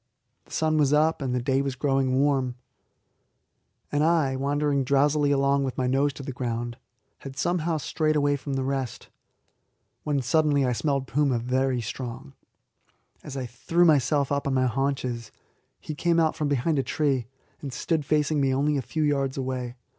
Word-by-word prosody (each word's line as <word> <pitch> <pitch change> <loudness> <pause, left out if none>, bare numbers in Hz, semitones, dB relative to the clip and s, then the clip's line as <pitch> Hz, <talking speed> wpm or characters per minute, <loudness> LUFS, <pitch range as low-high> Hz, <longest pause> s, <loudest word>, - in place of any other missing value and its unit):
The - - -23
sun 155 -1 +1
was 145 -1 +3
up, 155 +1 +3
and 130 -2 -1
the 125 - -1
day 135 +1 +2
growing 135 -1 0
warm, 135 -3 +1 1.4
and 145 +1 +1
I, 155 -5 +2
wandering 140 +1 0
drowsily 145 +2 +2
along 140 0 +2
with 130 -2 -3
my 130 - 0
nose 135 +3 +2
to 140 - -9
the 135 - -5
ground, 120 -1 -3 0.4
had 135 -1 -9
somehow 170 0 0
strayed 155 +1 0
away 145 -1 +2
from 140 0 -5
the 135 0 -1
rest, 135 -3 -3 0.9
when 145 -2 0
suddenly 145 +1 +2
I 125 - +1
smelled 140 +1 -1
puma 140 -1 +1
very 125 +1 0
strong. 130 +4 -6 0.9
As 140 -2 -7
I 130 - -3
threw 165 +9 +1
myself 145 -2 +3
up 140 0 0
on 135 - 0
my 130 0 +3
haunches, 130 -2 -2 0.5
he 155 - -6
came 170 +2 +1
out 160 -1 +2
from 150 - -1
behind 145 +2 +1
a - - +3
tree, 135 -6 0 0.3
and 140 - -5
stood 160 +4 -1
facing 150 0 +1
me 135 -1 +2
only 145 +2 +1
a - - 0
few 155 +4 -2
yards 140 -2 0
away. 130 -2 -3
140 Hz, 175 wpm, -26 LUFS, 130-150 Hz, 1.4 s, was